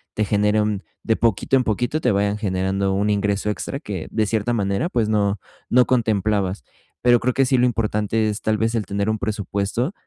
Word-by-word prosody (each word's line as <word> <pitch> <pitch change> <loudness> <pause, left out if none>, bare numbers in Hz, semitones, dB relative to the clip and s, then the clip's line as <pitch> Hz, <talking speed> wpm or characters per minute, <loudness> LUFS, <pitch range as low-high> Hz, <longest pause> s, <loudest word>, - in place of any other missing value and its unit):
te 105 - +1
genere 105 +1 +2
un 105 -2 -1 0.2
de 110 - +2
poquito 115 +3 +1
en 130 - +2
poquito 120 +8 0
te 125 - +2
vayan 100 +1 +1
generando 95 -1 -1
un 100 +2 0
ingreso 100 0 0
extra 135 +6 -5
que 100 - -6
de 110 -1 +1
cierta 110 +3 0
manera, 100 - 0
pues, 115 -9 0
no 100 -2 +1 0.3
no 125 0 +5
contemplabas. 105 - 0 0.4
Pero 120 -1 +5
creo 125 +2 0
que 135 - +3
sí 130 0 +2
lo 125 - +4
importante 110 -1 0
es 105 - -4
tal 110 0 0
vez, 115 +2 0
el 110 -3 -1
tener 100 +2 -1
un 110 - -1
presupuesto 100 - -2
105 Hz, 205 wpm, -22 LUFS, 100-115 Hz, 0.4 s, no